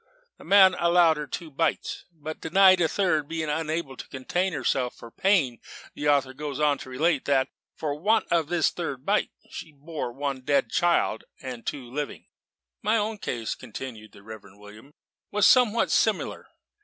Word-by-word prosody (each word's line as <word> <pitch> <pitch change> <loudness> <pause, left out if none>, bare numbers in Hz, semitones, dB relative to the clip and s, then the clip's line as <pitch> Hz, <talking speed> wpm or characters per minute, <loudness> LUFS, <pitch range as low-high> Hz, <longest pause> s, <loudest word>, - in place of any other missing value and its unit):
The - - -13
man 195 -2 +6
allowed 170 -2 +4
her 150 -1 -5
two 160 +3 -6
bites, 165 +4 -2
but 155 -1 -8
denied 185 +2 +5
a 165 - +4
third, 160 -6 0
being 160 -1 -3
unable 155 -2 -2
to - - -9
contain 175 +8 -2
himself 130 -4 -1
for 115 - -12
pain. 160 - +2 0.3
The 150 0 -1
author 135 -2 +2
goes 145 0 -5
on 145 -2 +2
to - - -9
relate 145 +3 +1
that, 135 -2 +2 0.3
for 150 -3 -3
want 210 +9 +1
of 165 -3 +2
this 175 -1 +2
third 140 -6 -5
bite, 205 +2 +1 0.2
she 165 - -8
bore 150 -2 -6
one 135 +1 -4
dead 140 +2 +1
child, 175 -1 +1
and 125 -3 -8
two 135 -3 -4
living. 145 +4 -5 0.6
My 215 +2 +2
own 215 0 -2
case," 115 - -3
continued 115 -2 -9
the 100 - -16
Reverend 110 -2 -12
William, 105 +5 -14 0.4
"was 210 -1 +2
somewhat 235 -3 +4
similar. - - 0
150 Hz, 170 wpm, -26 LUFS, 130-175 Hz, 0.6 s, man